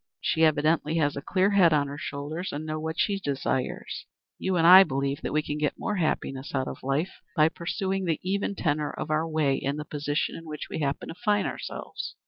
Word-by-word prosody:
She 160 - +1
evidently 155 +1 +3
has 145 -3 +1
a 140 - -4
clear 190 +6 +2
head 185 -5 +5
on 145 -1 +3
her 140 +1 -6
shoulders 150 +6 -4
and 150 +2 -5
knows 155 0 -3
what 160 +1 -4
she 200 -2 +1
desires. 135 -5 -3 0.3
You 190 -1 0
and 165 -2 +3
I 185 +3 +11
believe 140 -3 -2
that - - -3
we 155 +1 +1
can 150 0 -3
get 150 -2 0
more 210 -2 -2
happiness 140 -5 -2
out 130 -1 0
of - - -6
life 140 +7 -2
by 155 +1 +5
pursuing 190 +3 -2
the 165 -3 0
even 200 +2 -1
tenor 150 -4 0
of 155 - -5
our 155 +2 +1
way 155 -4 +2
in 140 +1 -2
the 150 - -5
position 145 0 -2
in 165 - -9
which 150 -1 -6
we - - -3
happen 140 -2 -2
to - - -6
find 205 -3 +2
ourselves." - - -5
155 Hz, 220 wpm, -27 LUFS, 145-175 Hz, 0.3 s, I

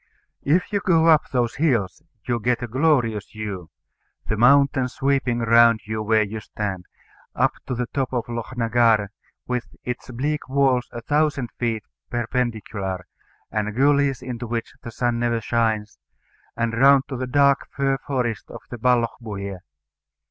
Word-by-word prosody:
If 175 +8 +1
you 200 - +2
go 170 -5 +3
up 160 -2 +4
those 120 -2 0
hills, 130 - +1 0.3
you 120 -1 0
get 125 +2 0
a - - -3
glorious 120 -5 +1
view 100 -6 -6 0.6
the 110 - -1
mountains 130 +2 +4
sweeping 135 -3 +1
round 115 -1 +5
you 110 0 -3
where 110 0 +3
you 110 +2 -5
stand, 100 -3 -5 0.5
up - - +3 0.2
to 125 - -2
the 125 +1 -1
top 135 +1 -2
of 120 -3 -1
Lochnagar, 115 -3 +1 0.4
with 125 -1 -2 0.2
its 125 +1 -5
bleak 145 +4 -3
walls 135 -2 +2
a 120 -1 -7
thousand 145 -3 0
feet 115 -3 -1 0.3
perpendicular, 110 -6 -2 0.5
and 105 -1 -2
gullies 140 0 +2
into 120 -1 -5
which 115 0 -4
the - - -7
sun 120 0 -1
never 120 -1 +1
shines, 110 -1 -1 0.6
and 115 -1 0
round 135 +3 +5
to 135 - -5
the 130 0 -3
dark 140 +1 +3
fir 135 -1 0
forests 125 -6 -3
of - - -9
the 120 - -6
Ballochbuie. 110 -5 -1
120 Hz, 150 wpm, -23 LUFS, 110-135 Hz, 0.6 s, round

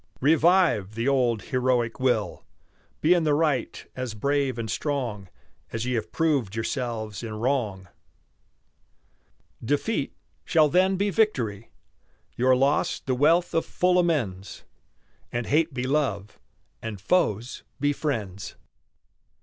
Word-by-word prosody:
Revive 155 - +3
the 115 +3 -1
old 125 -5 +2
heroic 125 -3 0
will; 120 -7 0 0.6
Be 165 +3 +5
in 175 -2 +2
the 150 -2 +2
right 150 -4 0
as 125 -4 -4
brave 140 +1 0
and 115 -1 -3
strong 120 -8 -3 0.4
As 115 0 -3
ye 125 - -1
have 115 - -2
proved 140 -11 0
yourselves 110 -3 -3
in 110 -2 -6
wrong. 110 -6 -1 1.8
Defeat 145 - -1 0.3
shall 155 -3 +3
then 185 +4 +3
be 200 +2 0
victory, 120 - 0 0.7
Your 130 +1 +4
loss 140 +3 +1
the 130 - -2
wealth 160 +7 +3
of 165 - +2
full 180 0 +2
amends, 115 - -1 0.7
And 120 0 -2
hate 160 +2 +2
be 125 -1 -3
love, 130 -8 -1 0.4
and 110 -3 -6
foes 115 - 0 0.2
be 145 +1 +2
friends. 110 -11 -4
130 Hz, 125 wpm, -25 LUFS, 110-150 Hz, 1.8 s, Be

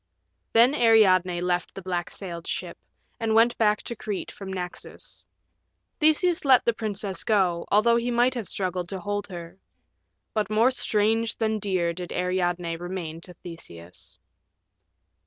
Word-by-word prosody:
Then 235 +4 +6
Ariadne 190 - +4
left 180 0 -1
the 195 - -6
black 175 -2 -2
sailed 170 -4 -7
ship, - - -4 0.4
and 225 -1 0
went 230 +2 +5
back 210 -2 +2
to 235 - -5
Crete 210 -3 -5
from 195 -1 -8
Naxos. 180 -2 -7 0.7
Theseus 325 +3 +3
let 265 -3 +5
the 235 - +3
princess 205 -3 -3
go, 185 -6 +1
although 235 +3 +4
he 235 +1 -1
might 245 +1 +3
have 235 -6 -4
struggled 180 -2 -3
to 195 - -4
hold 205 +1 -3
her. 175 -1 -9 0.7
But 215 -2 -1
more 225 +4 +4
strange 225 -1 +1
than 220 -1 0
dear 185 -4 0
did 180 0 -7
Ariadne 175 -2 -1
remain 175 -2 -6
to 180 0 -12
Theseus. 90 - -10
195 Hz, 145 wpm, -25 LUFS, 175-225 Hz, 0.7 s, Then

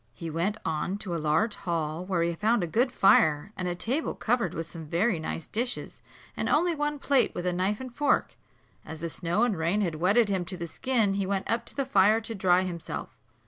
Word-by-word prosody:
He 165 +3 -6
went 180 +7 -1
on 165 +4 -1
to 195 -4 -5
a 165 - -2
large 160 +9 +2
hall, 165 -3 -3
where 185 -3 0
he 170 0 0
found 215 +4 +1
a - - +1
good 240 - +1
fire, 195 -4 +4
and 185 - -3
a 175 - -2
table 260 - -1
covered 230 -6 0
with 165 - -3
some 165 -1 -9
very 175 +4 +1
nice 160 0 -4
dishes, 245 +3 -3 0.3
and - - -2
only 340 +3 +3
one 295 -1 -1
plate 275 -2 +2
with 175 - -4
a 180 - +1
knife 190 +4 0
and 255 -2 -8
fork. 290 -1 +1 0.5
As 160 - -8
the 165 0 -4
snow 175 +7 0
and 240 -4 +2
rain 170 +5 0
had 175 -5 0
wetted 200 +8 +3
him 190 -3 0
to 185 +1 -5
the 170 - -4
skin, 220 +4 0
he 195 -1 -1
went 195 0 -1
up 230 0 -1
to - - -5
the 275 - -1
fire 210 -2 +4
to 225 0 -6
dry 185 -2 +3
himself. 175 -3 -5
190 Hz, 225 wpm, -28 LUFS, 170-230 Hz, 0.5 s, fire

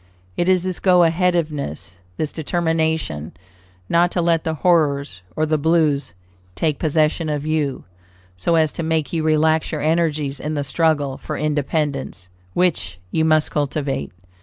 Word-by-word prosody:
It 175 - +1
is 185 -1 +3
this 185 -1 -3
go 180 -2 +5
aheaditiveness, 155 - -1 0.3
this 155 - -2
determination 160 - -1 0.5
not 170 - +3
to - - 0
let 165 -1 +2
the 160 -1 -2
"horrors" 145 - +1
or 155 - +1
the 155 0 +1
"blues" 155 -2 +1 0.4
take 155 -3 0
possession 155 +1 +1
of 150 -1 -2
you, 155 -3 -1 0.5
so 130 - 0
as 160 -2 +3
to - - -4
make 160 -1 -1
you 165 - 0
relax 155 0 +2
your 155 - -3
energies 155 -3 0
in 155 +2 -3
the 145 - -1
struggle 145 -2 0
for 155 - -5
independence, 145 - -2 0.3
which 90 - 0
you 160 - +1
must 155 -1 +3
cultivate. 140 - -2
155 Hz, 150 wpm, -21 LUFS, 145-165 Hz, 0.5 s, go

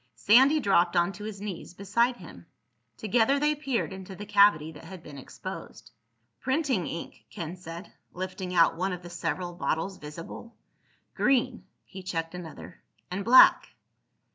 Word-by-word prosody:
Sandy 255 - +5
dropped 180 -7 +2
onto 180 +4 0
his 215 -2 -6
knees 195 -4 -7
beside 235 +6 +1
him. - - -13 0.5
Together 225 +5 +2
they 300 +1 +2
peered 275 -9 -2
into 190 0 -9
the 205 - -8
cavity 200 -6 +4
that 160 +1 -13
had 180 -1 -10
been 145 -3 -10
exposed. - - -9 0.5
"Printing 265 - 0
ink," 170 - -7
Ken 170 +1 -6
said, 170 0 -10 0.2
lifting 185 0 -5
out 170 -2 +4
one 185 +3 -1
of 180 0 -7
the 175 - -10
several 175 +1 -3
bottles 175 +2 -2
visible. 165 +10 -10 0.6
"Green." 255 -2 +1 0.2
He 190 - -10
checked 165 -3 -4
another. 175 0 -10 0.3
"And 195 +2 -3
black." 250 +4 +6
190 Hz, 145 wpm, -28 LUFS, 170-225 Hz, 0.6 s, black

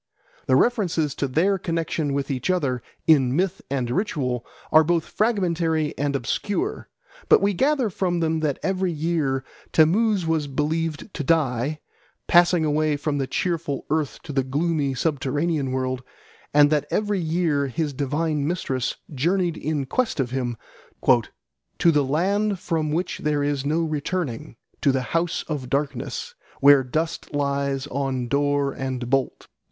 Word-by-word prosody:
The 130 - +4
references 170 - +2
to 140 - -2
their 185 +9 +2
connexion 165 -4 -1
with 140 0 -2
each 130 +4 -2
other 140 -9 0 0.2
in 135 -5 +4
myth 185 +2 0
and 130 -3 -1
ritual 130 - -1 0.3
are 155 0 +7
both 170 0 +1
fragmentary 170 -8 0
and 140 0 -1
obscure, 205 - -2 0.4
but - - +7
we 200 +1 +2
gather 265 - +1
from 175 -2 0
them 160 -1 +1
that 150 -3 0
every 190 -1 0
year 150 -4 -1 0.3
Tammuz 195 +4 +3
was 160 -2 0
believed 155 +5 -2
to 145 - -3
die, 145 -1 +1 0.4
passing 175 -1 +5
away 155 0 +1
from 145 0 -2
the 135 - -1
cheerful 165 -5 -2
earth 155 -3 0
to 150 - -7
the 135 - +2
gloomy 145 0 0
subterranean 145 +1 0
world, 130 -1 -1 0.5
and 145 0 +5
that 150 -1 +1
every 205 -2 0
year 160 -4 +1
his 150 +2 -2
divine 150 +2 -1
mistress 135 -7 -1 0.2
journeyed 170 +5 +1
in 150 -4 -2
quest 240 - -1
of 125 -3 0
him 125 -3 -2 1.2
"to 170 - +4
the 150 -2 +3
land 195 +9 +1
from 160 -4 -1
which 170 +3 -2
there 150 -1 0
is 140 -1 -1
no 160 +3 +1
returning, 155 -5 -3 0.3
to 140 - +4
the 130 -1 0
house 165 0 0
of 140 -5 -4
darkness, 140 - -2 0.3
where 140 -1 +7
dust 155 +4 -3
lies 140 -1 0
on 135 -3 -2
door 145 +1 +1
and 130 -2 -4
bolt." 135 +1 -1
150 Hz, 150 wpm, -24 LUFS, 135-170 Hz, 1.2 s, are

